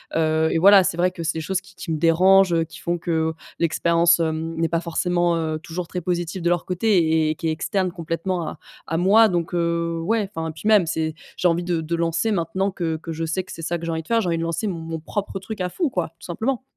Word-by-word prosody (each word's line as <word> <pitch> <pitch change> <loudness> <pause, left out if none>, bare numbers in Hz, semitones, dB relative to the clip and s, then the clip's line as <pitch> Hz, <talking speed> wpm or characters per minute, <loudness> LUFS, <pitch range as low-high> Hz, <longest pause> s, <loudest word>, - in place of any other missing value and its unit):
Heu, 160 0 +2
et - - +1
voilà, 195 +2 +8
c'est 170 - -1
vrai 180 +1 +2
que 180 - -8
c'est 165 - 0
des - - -2
choses 190 +4 -2
qui 190 0 -19
qui 165 - -6
me 160 - 0
dérangent, 170 +1 +4
qui 160 - -13
font 175 +1 -1
que, 170 +1 -4
heu, 160 0 +1 0.3
l'expérience, 170 +1 +3
hem, 160 0 -2
n'est 165 0 +1
pas 170 - +1
forcément, 175 0 0
heu, 160 -1 -2
toujours 170 +2 -6
très 180 - -4
positive 175 +1 -2
de 170 - +1
leur 175 -1 0
côté 170 -5 +2
et 155 - -1
qui 165 - -3
est - - +1
externe 180 +4 -1
complètement 170 +1 -3
à - - -7 0.3
à 165 - -2
moi. 210 +6 +5
Donc 175 -2 -2
heu, 170 -1 0
ouais, 210 +3 0
enfin, 160 0 -3
puis 160 +6 -6
même, 210 -6 +5
c'est 160 0 -1 0.2
j'ai 180 - +2
envie 170 0 +1
de 175 -1 -1
de 160 +1 -2
lancer, 170 +6 0
maintenant 190 +2 0
que 165 -4 -2
que 165 +1 -7
je 165 +1 -4
sais 165 +4 -1
que - - -11
c'est - - -8
ça 170 +2 -2
que 170 - -7
j'ai 165 - -2
envie 160 0 -3
de - - -23
faire, 230 0 +2
j'ai 205 - -1
envie 170 -1 +1
de 165 - -2
lancer 170 +6 -2
mon 165 -3 -4
propre 195 +4 -4
truc 195 +1 -7
à 180 - -1
fond, 330 - -1
quoi, 180 -10 -2
tout - - -12
simplement. 235 +9 -2
170 Hz, 265 wpm, -23 LUFS, 165-185 Hz, 0.3 s, voilà